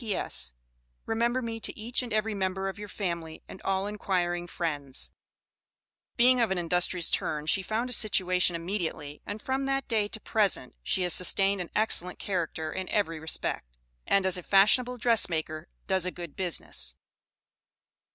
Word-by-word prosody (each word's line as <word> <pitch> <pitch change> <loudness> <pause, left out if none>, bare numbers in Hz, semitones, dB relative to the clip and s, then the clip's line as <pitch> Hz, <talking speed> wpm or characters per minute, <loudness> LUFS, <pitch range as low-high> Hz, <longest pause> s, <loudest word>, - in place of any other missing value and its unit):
P.S. 190 - -1 0.5
Remember 235 +3 0
me 225 -1 -4
to 225 - -5
each, 235 +4 0
and 245 -2 -7
every 215 +1 0
member 190 -1 -2
of 195 - -6
your 210 - -7
familly 170 -5 -5
and - - -11
all 195 0 -1
Enquiring 180 -4 -2
Friends. 145 -6 -1 1.1
Being 250 +1 +5
of 230 - +2
an 190 - -1
industrious 175 0 +2
turn 150 -1 -1
she 180 +5 +3
found 220 +6 -2
a 250 - -1
situation 185 -5 +3
immediately, 165 -4 -4
and 205 +1 -5
from 265 +4 -2
that 270 -1 -1
day 215 -3 +1
to 220 - -4
the - - -22
present, 200 - +2
she 180 - 0
has 175 -2 +2
sustained 195 +2 +3
an 175 - -6
excellent 180 -4 +3
character 165 -4 -3
in 190 -1 -5
every 165 -6 0
respect, 60 - -3 0.3
and 195 -1 +3
as 185 -1 +2
a - - -7
fashionable 220 +7 +4
dressmaker 170 -9 0 0.2
does 190 -2 +2
a - - +1
good 170 -4 -9
business. 170 - +1
190 Hz, 165 wpm, -28 LUFS, 170-215 Hz, 1.1 s, Being